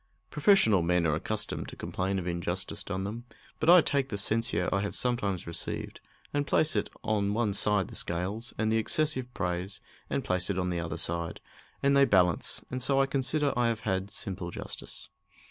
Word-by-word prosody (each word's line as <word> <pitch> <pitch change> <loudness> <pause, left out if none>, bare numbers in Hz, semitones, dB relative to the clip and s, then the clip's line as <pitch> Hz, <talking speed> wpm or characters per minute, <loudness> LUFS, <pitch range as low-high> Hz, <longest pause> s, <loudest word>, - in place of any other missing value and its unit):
Professional 150 - +5
men 85 0 +2
are 80 - +2
accustomed 105 +7 -2
to - - -8
complain 95 +1 -2
of 90 - -3
injustice 85 +1 -2
done 95 -1 -3
them, 115 +5 -5 0.3
but 160 - +2
I 175 0 +9
take 140 -3 0
the 100 - -3
censure 105 -4 +1
I 100 - +2
have 100 - -3
sometimes 105 -8 0
received 85 0 -4 0.3
and 145 0 0
place 155 - +3
it - - 0
on 105 -1 0
one 110 -3 +1
side 100 -2 +1
the - - -11
scales, 95 +7 -2
and 110 0 +1
the 110 - +3
excessive 130 +1 +1
praise, 90 +2 -2 0.3
and - - -1
place 90 0 0
it 100 - -1
on 90 -1 0
the 85 - -1
other 85 0 -4
side, 85 0 -2 0.4
and 140 0 +4
they 140 0 +7
balance, 90 -7 +2
and 130 0 -3
so 135 +2 +2
I 135 - +5
consider 140 +2 +1
I 120 -1 +2
have 115 -1 -1
had 95 -1 -1
simple 95 -4 -4
justice. - - -6
100 Hz, 195 wpm, -29 LUFS, 90-125 Hz, 0.4 s, I